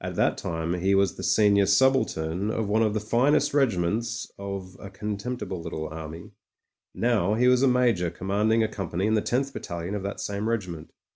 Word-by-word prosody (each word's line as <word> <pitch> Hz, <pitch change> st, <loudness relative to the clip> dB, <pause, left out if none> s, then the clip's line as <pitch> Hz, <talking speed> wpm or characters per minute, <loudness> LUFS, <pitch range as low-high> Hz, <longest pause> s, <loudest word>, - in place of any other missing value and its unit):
At -, -, -4 dB
that -, -, +2 dB
time 80 Hz, 0 st, -3 dB
he 95 Hz, +2 st, +1 dB
was 95 Hz, -1 st, +3 dB
the -, -, -9 dB
senior 100 Hz, +1 st, +3 dB
subaltern 100 Hz, -5 st, +2 dB
of 110 Hz, -1 st, -1 dB
one 110 Hz, +2 st, +2 dB
of 110 Hz, -1 st, +1 dB
the -, -, +1 dB
finest 135 Hz, +7 st, +2 dB
regiments 115 Hz, -2 st, 0 dB
of 100 Hz, -2 st, -6 dB
'^a 100 Hz, -, -9 dB
contemptible 105 Hz, -1 st, -4 dB
little 80 Hz, -2 st, -5 dB
army''; 80 Hz, +1 st, -8 dB, 0.6 s
now 110 Hz, -4 st, +1 dB
he 125 Hz, +3 st, +3 dB
was 125 Hz, 0 st, +4 dB
a 135 Hz, -, +4 dB
major 120 Hz, -9 st, +2 dB
ccmmianding 105 Hz, +6 st, +1 dB
a -, -, +1 dB
company 95 Hz, -3 st, -3 dB
in 110 Hz, -, +2 dB
the 110 Hz, -, +3 dB
tenth 135 Hz, +5 st, -1 dB
battalion 85 Hz, +2 st, -5 dB
of 105 Hz, -, -2 dB
that 100 Hz, +1 st, -5 dB
same 100 Hz, +2 st, -3 dB
regiment. 90 Hz, -8 st, -3 dB
100 Hz, 190 wpm, -26 LUFS, 90-115 Hz, 0.6 s, was